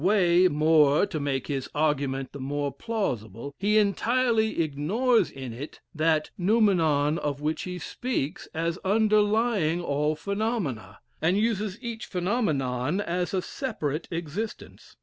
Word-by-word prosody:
Way, 185 -2 +5
more, 150 0 +4
to 155 - -4
make 135 -3 -1
his 135 -3 -3
argument 140 -3 0
the 140 - -9
more 140 +1 -2
plausible, 140 - -3
he 210 +3 +2
entirely 220 +2 +2
ignores 195 - +1
in 130 -3 -7
it 140 +6 -8
that 155 -1 +1
noumenon 170 -7 +3
of 145 -1 -2
which 155 +2 -1
he 180 -1 -5
speaks 205 - -3
as 165 +2 -2
underlying 210 -3 +2
all 150 -2 0
phenomena, 200 - -3 0.2
and 175 +4 +2
uses 210 -2 0
each 230 -2 -5
phenomenon 165 - 0
as 180 -2 -1
a 185 -2 -1
separate 160 - -3
existence. 170 +6 -6
170 Hz, 130 wpm, -27 LUFS, 145-210 Hz, 0.2 s, Way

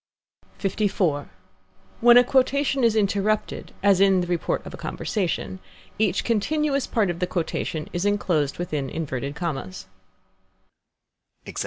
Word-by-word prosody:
LIV. 190 -7 0 0.7
When 240 +1 +7
a 245 - +8
quotation 270 +1 +2
is 230 -2 +4
interrupted, 205 0 0
as 195 -2 +4
in 195 -2 +5
the - - -1
report 175 -1 -1
of - - -8
a - - -7
conversation, 190 -2 -3 0.4
each 205 -4 +1
continuous 275 +5 0
part 210 -6 +1
of 170 - -7
the 180 - 0
quotation 160 -3 -3
is 175 0 -1
enclosed 180 -8 0
within 150 -6 -3
inverted 140 -3 -4
commas. 150 - -4
195 Hz, 125 wpm, -24 LUFS, 165-220 Hz, 0.7 s, a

